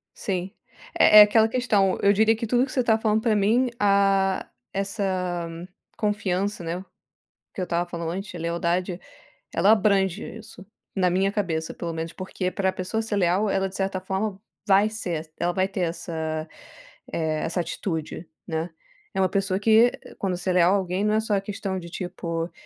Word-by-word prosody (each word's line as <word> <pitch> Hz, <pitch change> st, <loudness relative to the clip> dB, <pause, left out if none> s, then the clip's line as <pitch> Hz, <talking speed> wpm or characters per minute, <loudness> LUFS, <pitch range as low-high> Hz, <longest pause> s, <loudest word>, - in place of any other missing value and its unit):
Sim. 190 Hz, -1 st, -3 dB, 0.5 s
É 210 Hz, -, +8 dB
é -, -, +13 dB
aquela 220 Hz, +2 st, +6 dB
questão. 215 Hz, -6 st, +1 dB
Eu 200 Hz, 0 st, +5 dB
diria 220 Hz, +2 st, +4 dB
que 230 Hz, 0 st, -4 dB
tudo 245 Hz, +3 st, +3 dB
que 255 Hz, -, -10 dB
você 255 Hz, -, +1 dB
tá 220 Hz, -1 st, +3 dB
falando 220 Hz, 0 st, +1 dB
pra 220 Hz, -2 st, +2 dB
mim, 230 Hz, +5 st, +3 dB
ah, 195 Hz, -1 st, +2 dB, 0.3 s
essa 190 Hz, -3 st, -2 dB, 0.5 s
confiança, 205 Hz, -3 st, -1 dB
né, 165 Hz, +2 st, -3 dB
o 190 Hz, -, -9 dB, 0.7 s
que -, -, -8 dB
eu -, -, 0 dB
estava 175 Hz, +1 st, -1 dB
falando 170 Hz, -1 st, -4 dB
antes, 195 Hz, +1 st, -5 dB
a -, -, -6 dB
lealdade, 170 Hz, +2 st, -1 dB, 0.6 s
ela 190 Hz, +6 st, +4 dB
abrange 195 Hz, -4 st, +2 dB, 0.2 s
isso. 195 Hz, -3 st, -13 dB, 0.3 s
Na 185 Hz, -2 st, +2 dB
minha 195 Hz, +2 st, +1 dB
cabeça, 165 Hz, -6 st, -2 dB
pelo 170 Hz, -1 st, -4 dB
menos, 165 Hz, +1 st, -4 dB
porque 185 Hz, 0 st, -4 dB
pra 190 Hz, 0 st, 0 dB
pessoa 185 Hz, +5 st, -2 dB
ser 220 Hz, -2 st, -2 dB
leal, 190 Hz, +3 st, +2 dB
ela 195 Hz, 0 st, +1 dB
de 190 Hz, -, -13 dB
certa 195 Hz, -1 st, -1 dB
forma 190 Hz, +1 st, -3 dB, 0.3 s
vai 200 Hz, +2 st, +5 dB
ser 175 Hz, -8 st, -4 dB
ela 175 Hz, +1 st, 0 dB
vai 185 Hz, +1 st, +1 dB
ter 195 Hz, -1 st, -5 dB
essa, 160 Hz, -2 st, -3 dB, 0.7 s
eh, 155 Hz, -2 st, -1 dB
essa 175 Hz, +2 st, -1 dB
atitude, 165 Hz, -1 st, -4 dB, 0.2 s
né. 160 Hz, +1 st, -2 dB, 0.4 s
É 190 Hz, -, 0 dB
uma 185 Hz, -, +3 dB
pessoa 195 Hz, -1 st, 0 dB
que 225 Hz, +3 st, +5 dB, 0.3 s
quando 190 Hz, -2 st, -1 dB
ser 185 Hz, +1 st, -2 dB
leal 180 Hz, +1 st, +5 dB
a -, -, +4 dB
alguém 185 Hz, 0 st, -2 dB
não 210 Hz, -, +2 dB
é -, -, +3 dB
só 215 Hz, -2 st, 0 dB
a 195 Hz, -, +1 dB
questão 195 Hz, -1 st, -4 dB
de 170 Hz, -1 st, -9 dB
tipo: 170 Hz, -2 st, -4 dB
190 Hz, 185 wpm, -25 LUFS, 175-205 Hz, 0.7 s, é